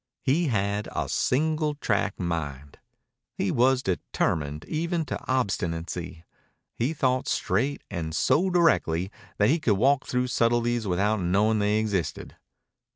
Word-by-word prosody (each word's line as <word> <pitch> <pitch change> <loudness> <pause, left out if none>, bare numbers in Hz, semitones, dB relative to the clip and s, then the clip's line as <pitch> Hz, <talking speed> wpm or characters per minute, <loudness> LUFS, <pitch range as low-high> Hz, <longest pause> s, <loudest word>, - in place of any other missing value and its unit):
He 155 +5 +2
had 100 -3 -1
a - - -1
single 155 +2 0
track 100 -8 -1
mind. 75 -5 -4 0.6
He 95 - -1
was 130 +1 +3
determined 75 -4 -2
even 165 +1 -1
to - - -4
obstinacy. 85 -7 -2 0.5
He 120 +6 -1
thought 130 -4 0
straight, 125 +10 0
and 80 -4 -4
so 180 - +2
directly 100 - +2 0.3
that 105 +1 +3
he 165 - +3
could 110 -9 +2
walk 140 +5 +2
through 125 0 0
subtleties 120 -1 +1
without 100 +4 +1
knowing 105 +5 +2
they 105 +1 +2
existed. 105 -5 -2
110 Hz, 130 wpm, -26 LUFS, 90-135 Hz, 0.6 s, was